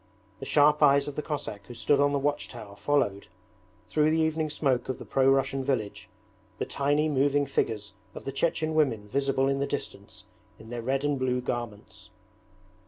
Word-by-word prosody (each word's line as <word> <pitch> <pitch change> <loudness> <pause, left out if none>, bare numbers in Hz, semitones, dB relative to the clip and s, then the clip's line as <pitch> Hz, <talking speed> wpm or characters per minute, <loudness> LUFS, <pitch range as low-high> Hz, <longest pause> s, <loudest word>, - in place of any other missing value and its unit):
The - - -7
sharp 150 0 +4
eyes 140 -1 +5
of 145 - -5
the - - -2
Cossack 125 -10 -5
who 120 - -9
stood 140 +4 +2
on 145 0 +3
the 145 - +1
watch 145 +1 -1
tower 110 -4 -10
followed, 100 -4 0 0.6
through 150 +5 +2
the 160 - +2
evening 160 0 0
smoke 135 -5 0
of 130 - -2
the - - -10
pro 135 0 +3
Russian 135 0 +1
village, 120 -7 -2 0.5
the - - -2
tiny 145 +2 +1
moving 145 0 +2
figures 105 -7 -2 0.2
of - - -8
the 135 - -3
Chechen 155 +2 0
women 125 -10 +1
visible 135 +1 +1
in 135 0 0
the 140 - 0
distance - - -6 0.3
in 110 +1 -13
their 120 -1 -4
red 135 +3 -1
and 145 -2 0
blue 125 -1 0
garments. 120 -4 -6
135 Hz, 185 wpm, -28 LUFS, 120-145 Hz, 0.6 s, eyes